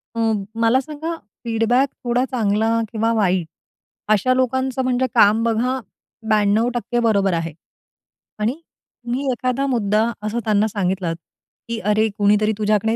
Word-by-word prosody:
अ, -, -, -3 dB, 0.4 s
मला 230 Hz, +3 st, +4 dB
सांगा 310 Hz, +4 st, -5 dB, 0.3 s
फीडबॅक 235 Hz, +4 st, +2 dB
थोडा 245 Hz, +1 st, +1 dB
चांगला 225 Hz, -1 st, +1 dB
किंवा 225 Hz, 0 st, 0 dB
वाईट 185 Hz, -6 st, +1 dB, 0.7 s
अशा 215 Hz, +5 st, +2 dB
लोकांचं 260 Hz, +1 st, 0 dB
म्हणजे 255 Hz, 0 st, +1 dB
काम 215 Hz, 0 st, +5 dB
बघा 235 Hz, +3 st, 0 dB, 0.5 s
92% 225 Hz, +4 st, +1 dB
बरोबर 200 Hz, -4 st, +2 dB
आहे. 165 Hz, -1 st, -2 dB, 0.9 s
आणि 215 Hz, +3 st, +1 dB
तुम्ही 250 Hz, -4 st, -7 dB
एखादा 255 Hz, +2 st, -1 dB
मुद्दा 215 Hz, -4 st, +1 dB, 0.2 s
असं 215 Hz, +3 st, -1 dB
त्यांना 215 Hz, 0 st, +2 dB
सांगितलात, 190 Hz, -5 st, -1 dB, 0.5 s
की 230 Hz, -1 st, -2 dB
"अरे 215 Hz, +1 st, +2 dB
कुणीतरी 210 Hz, +1 st, +3 dB
तुझ्याकडे 215 Hz, +1 st, +1 dB
225 Hz, 125 wpm, -21 LUFS, 210-250 Hz, 0.9 s, काम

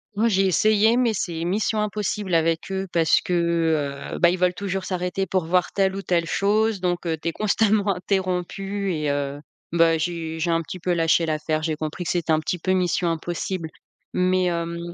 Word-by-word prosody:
Ouais, 220 Hz, +3 st, +2 dB
j'ai 195 Hz, -2 st, +3 dB
essayé, 215 Hz, +5 st, +3 dB
mais 245 Hz, -2 st, +3 dB
c'est 170 Hz, -5 st, -3 dB
mission 210 Hz, +4 st, 0 dB
impossible 210 Hz, -2 st, -2 dB
avec 165 Hz, +2 st, +1 dB
eux. 190 Hz, 0 st, -2 dB
Parce 165 Hz, -1 st, +3 dB
que, 165 Hz, -5 st, 0 dB
heu, -, -, -5 dB
bah, 170 Hz, -, +6 dB
ils 180 Hz, -, -2 dB
veulent 180 Hz, 0 st, +3 dB
toujours 195 Hz, -1 st, -3 dB
s'arrêter 185 Hz, +1 st, -2 dB
pour 185 Hz, -3 st, 0 dB
voir 180 Hz, +2 st, +1 dB
telle 195 Hz, -1 st, +1 dB
ou 195 Hz, -, -4 dB
telle 175 Hz, -3 st, 0 dB
chose, 210 Hz, +3 st, +1 dB
donc 175 Hz, -1 st, -1 dB
heu, 165 Hz, -1 st, 0 dB
tu 155 Hz, -, -6 dB
es -, -, -2 dB
constamment 210 Hz, +1 st, +1 dB
interrompue 190 Hz, +1 st, -2 dB
et 150 Hz, -2 st, -1 dB
heu, 140 Hz, 0 st, -2 dB, 0.3 s
bah, 165 Hz, -1 st, +4 dB
j'ai 160 Hz, -1 st, -3 dB
j'ai 165 Hz, +2 st, 0 dB
un 165 Hz, 0 st, +2 dB
petit 185 Hz, -, -8 dB
peu 180 Hz, +1 st, 0 dB
lâché 165 Hz, 0 st, +2 dB
l'affaire. 155 Hz, 0 st, -1 dB
J'ai 155 Hz, 0 st, -1 dB
compris 155 Hz, +3 st, -5 dB
que -, -, -3 dB
c'était 170 Hz, -2 st, 0 dB
un 155 Hz, -, +4 dB
petit 170 Hz, +3 st, -2 dB
peu 185 Hz, +2 st, -1 dB
mission 180 Hz, -1 st, +1 dB
impossible, 170 Hz, +1 st, -3 dB, 0.4 s
mais 185 Hz, 0 st, +2 dB
hem, 170 Hz, -1 st, -2 dB
180 Hz, 200 wpm, -23 LUFS, 165-195 Hz, 0.4 s, bah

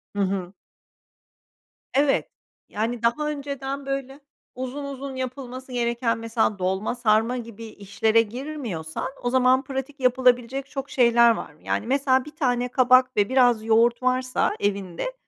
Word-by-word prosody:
Hı -, -, -3 dB
hı. 190 Hz, -1 st, -2 dB, 1.4 s
Evet. 275 Hz, 0 st, +2 dB, 0.4 s
Yani, 230 Hz, +2 st, -3 dB
daha 300 Hz, +6 st, +1 dB
önceden, 280 Hz, -1 st, -5 dB
böyle, 275 Hz, 0 st, -4 dB, 0.4 s
uzun 260 Hz, +3 st, -5 dB
uzun 275 Hz, -1 st, -6 dB
yapılması 255 Hz, 0 st, -6 dB
gereken 235 Hz, -1 st, 0 dB
mesela, 225 Hz, -3 st, -1 dB
dolma, 190 Hz, +5 st, -1 dB
sarma 230 Hz, +1 st, +2 dB
gibi 230 Hz, -1 st, -8 dB
işlere 220 Hz, +2 st, +1 dB
girmiyorsan, 230 Hz, -, -5 dB, 0.2 s
o 245 Hz, -, +1 dB
zaman 260 Hz, +1 st, +3 dB
pratik 270 Hz, +1 st, -6 dB
yapılabilecek 255 Hz, +1 st, +2 dB
çok 270 Hz, 0 st, -5 dB
şeyler 235 Hz, -2 st, +5 dB
var. 150 Hz, -9 st, -5 dB
Yani, 225 Hz, -, -2 dB
mesela 265 Hz, -1 st, +2 dB
1 300 Hz, -, -12 dB
tane 250 Hz, -5 st, 0 dB
kabak 255 Hz, -1 st, +4 dB
ve 205 Hz, -1 st, +3 dB
biraz 245 Hz, -4 st, +3 dB
yoğurt 230 Hz, +2 st, +3 dB
varsa 255 Hz, 0 st, +1 dB
evinde, 200 Hz, -, -2 dB
250 Hz, 135 wpm, -24 LUFS, 225-270 Hz, 1.4 s, şeyler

